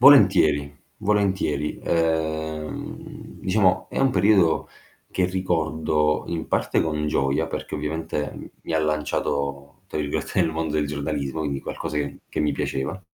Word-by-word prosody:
Volentieri, 95 - +7 0.3
volentieri. 95 -8 +1
Uhm, 80 -1 -2
diciamo, 95 -1 +2
è - - -3
un 135 - +4
periodo 95 -5 +4 0.4
che 95 - +1
ricordo 80 -4 +1
in 85 -1 -3
parte - - +1
con 75 -1 0
gioia, 70 -2 +1
perché - - -5
ovviamente 75 0 -3
mi - - -5
ha - - +4
"lanciato" 70 -2 -1
tra 80 - -3
virgolette 75 +5 -1
nel 85 -2 +2
mondo 80 -1 -2
del 75 -1 +2
giornalismo, 70 0 -2
quindi 70 -3 -1
qualcosa 75 -2 -4
che 70 -1 -2
che - - -5
mi 75 - +2
piaceva. 70 +8 -2
80 Hz, 135 wpm, -24 LUFS, 75-90 Hz, 0.4 s, Volentieri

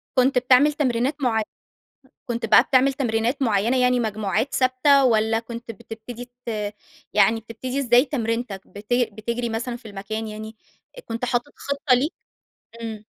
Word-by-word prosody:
كنت 255 0 +4
بتعمل 255 +4 +5
تمرينات 260 -1 0
معي 225 -4 +2 0.8
كنت 235 -2 -2
بقى - - +7
بتعمل 265 +1 +3
تمرينات 240 0 -1
معيَّنة 225 +2 +2
يعني 250 0 +3
مجموعات 215 +2 -1
ثابتة 265 +2 +4
والّا 225 -2 +3
كنت 235 0 -8
بتبتدي 230 +2 -9 0.2
ت - - -6 0.6
يعني 210 +2 +4
بتبتدي 240 +4 -5
إزاي 245 0 +4
تمرينتَك، 230 -6 -3
بتج 220 +5 -1
بتجري 235 +3 -3
مثلًا 235 +2 -3
في 230 -2 -12
المكان 215 +2 -5
يعني؟ 220 +1 -8 0.5
كنت 230 +2 -4
حاطط 245 +3 -1
خِطة 280 -2 +1
ليك؟ 280 +7 +1 0.7
امم. 220 -2 -6
235 Hz, 140 wpm, -23 LUFS, 220-255 Hz, 0.8 s, بقى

